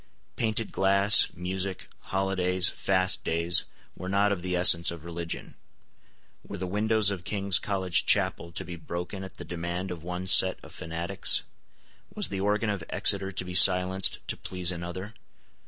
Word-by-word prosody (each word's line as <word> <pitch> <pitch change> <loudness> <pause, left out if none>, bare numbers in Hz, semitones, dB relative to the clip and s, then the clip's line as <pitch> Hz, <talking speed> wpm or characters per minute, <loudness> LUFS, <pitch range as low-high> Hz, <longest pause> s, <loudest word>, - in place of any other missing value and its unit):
Painted 110 -1 -3
glass, 100 +2 +4
music, 95 +2 -5
holidays, 95 -1 +1
fast 95 -1 +1
days, 85 +1 +1 0.3
were 95 - -8
not 100 +1 +1
of 100 -3 -3
the 90 0 -3
essence 85 -1 +4
of 85 -2 -9
religion. 85 -1 -7 0.9
Were 100 - -9
the 95 - -5
windows 105 +2 +1
of 95 -4 -6
King's 100 +1 +2
College 95 -3 0
Chapel 85 - 0
to - - -5
be 90 -1 -8
broken 90 +4 -7
at 95 - -11
the - - -9
demand 85 +2 -5
of 85 -2 -8
one 90 +1 -6
set 95 0 +6
of - - -14
fanatics? 85 +1 0 0.7
Was - - -2
the 95 - -5
organ 105 +2 -1
of 100 -5 -5
Exeter 95 0 +2
to 90 -1 -5
be 90 - -8
silenced 90 +1 +4
to - - -1
please 90 -1 -3
another? 90 +4 -7
95 Hz, 160 wpm, -26 LUFS, 90-100 Hz, 0.9 s, set